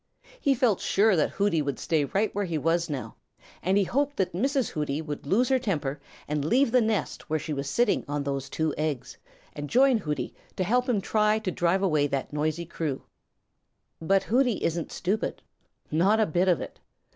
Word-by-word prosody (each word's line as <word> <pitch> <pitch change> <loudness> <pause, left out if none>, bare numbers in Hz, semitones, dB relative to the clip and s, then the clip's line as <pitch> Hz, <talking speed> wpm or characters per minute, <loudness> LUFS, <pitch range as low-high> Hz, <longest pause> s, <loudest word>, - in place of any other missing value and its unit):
He 280 - +2
felt 235 -6 +2
sure 210 0 +3
that 155 - +2
Hooty 200 -5 +1
would 140 -3 -2
stay 155 -3 0
right 200 +8 0
where 205 0 -1
he 170 -3 -2
was 165 +3 +1
now, 140 -4 -5 0.4
and 190 +3 +2
he 205 - +4
hoped 285 +8 -1
that 185 -3 0
Mrs. 265 - 0
Hooty 150 -1 -2
would 150 -3 -6
lose 235 - +3
her 265 -1 +3
temper 150 - -2 0.3
and 150 -1 -1
leave 240 - +3
the 250 0 +5
nest 220 -6 -2
where 155 - +1
she 155 +1 -4
was 140 0 -3
sitting 235 +3 +2
on 145 0 -2
those 140 -1 -3
two 160 -1 -1
eggs 150 -5 -2 0.4
and 145 0 -6
join 260 -1 +4
Hooty 150 -6 -3 0.2
to 185 - 0
help 245 +7 +1
him 215 -5 +2
try 215 +1 +2
to 220 -4 -3
drive 175 +3 +1
away 155 -6 +2
that 140 0 -3
noisy 155 +3 -1
crew. 155 -4 -4 1.0
But 195 +4 +2
Hooty 245 0 +1
isn't 170 0 -1
stupid. 195 +4 -2 0.5
Not 190 +8 +3
a 220 - +4
bit 175 +2 +1
of 180 -3 +3
it. - - -8
175 Hz, 195 wpm, -27 LUFS, 150-220 Hz, 1.0 s, the